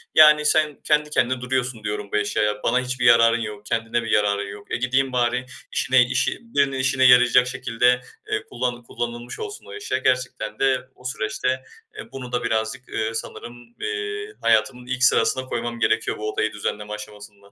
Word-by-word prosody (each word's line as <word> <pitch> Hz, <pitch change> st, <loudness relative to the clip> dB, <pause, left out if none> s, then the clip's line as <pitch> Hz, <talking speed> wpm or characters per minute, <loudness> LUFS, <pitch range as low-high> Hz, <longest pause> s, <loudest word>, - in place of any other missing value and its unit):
Yani, 150 Hz, -1 st, +7 dB
"Sen 150 Hz, -1 st, +2 dB
kendi 150 Hz, -1 st, +2 dB
kendine 130 Hz, -3 st, 0 dB
duruyorsun," 125 Hz, -3 st, -2 dB
diyorum 105 Hz, -1 st, -4 dB
bu -, -, +3 dB
eşyaya, 105 Hz, 0 st, 0 dB
bana 125 Hz, +2 st, +2 dB
hiçbir 125 Hz, -1 st, -2 dB
yararın 115 Hz, -1 st, +6 dB
yok, 105 Hz, -2 st, -6 dB
kendine 115 Hz, +2 st, -1 dB
bir 115 Hz, -, -5 dB
yararın 100 Hz, -1 st, +2 dB
yok. 100 Hz, 0 st, -11 dB
E, -, -, 0 dB
gideyim 130 Hz, +2 st, +1 dB
bari 125 Hz, +1 st, +1 dB, 0.3 s
işine 130 Hz, 0 st, +3 dB
işi 125 Hz, 0 st, 0 dB
birinin 140 Hz, -, 0 dB
işine 130 Hz, 0 st, +1 dB
yarayacak 125 Hz, 0 st, +6 dB
şekilde, 125 Hz, -1 st, +1 dB, 0.3 s
eee, 420 Hz, 0 st, 0 dB
kullan 120 Hz, -, -3 dB
kullanılmış 120 Hz, +1 st, -6 dB
olsun 420 Hz, -1 st, -7 dB
o -, -, -11 dB
eşya. 420 Hz, +1 st, -2 dB
Gerçekten 125 Hz, -4 st, -1 dB
de 130 Hz, -1 st, +1 dB
o -, -, -20 dB
süreçte, 130 Hz, +1 st, -2 dB, 0.3 s
eee, 420 Hz, -, -9 dB
bunu 125 Hz, -2 st, -8 dB
da 125 Hz, 0 st, -1 dB
birazcık, 110 Hz, +3 st, -2 dB
eee, 110 Hz, 0 st, -2 dB
sanırım, 120 Hz, +1 st, -8 dB
eee, 425 Hz, -1 st, -4 dB
hayatımın 125 Hz, -2 st, +2 dB
ilk 130 Hz, +1 st, -2 dB
sırasına 130 Hz, 0 st, +3 dB
koymam 120 Hz, -1 st, -4 dB
gerekiyor 115 Hz, 0 st, +1 dB
bu 110 Hz, 0 st, -3 dB
odayı 110 Hz, 0 st, -1 dB
düzenleme 105 Hz, 0 st, -4 dB
aşamasında. 105 Hz, -1 st, -11 dB
125 Hz, 175 wpm, -23 LUFS, 110-130 Hz, 0.3 s, Yani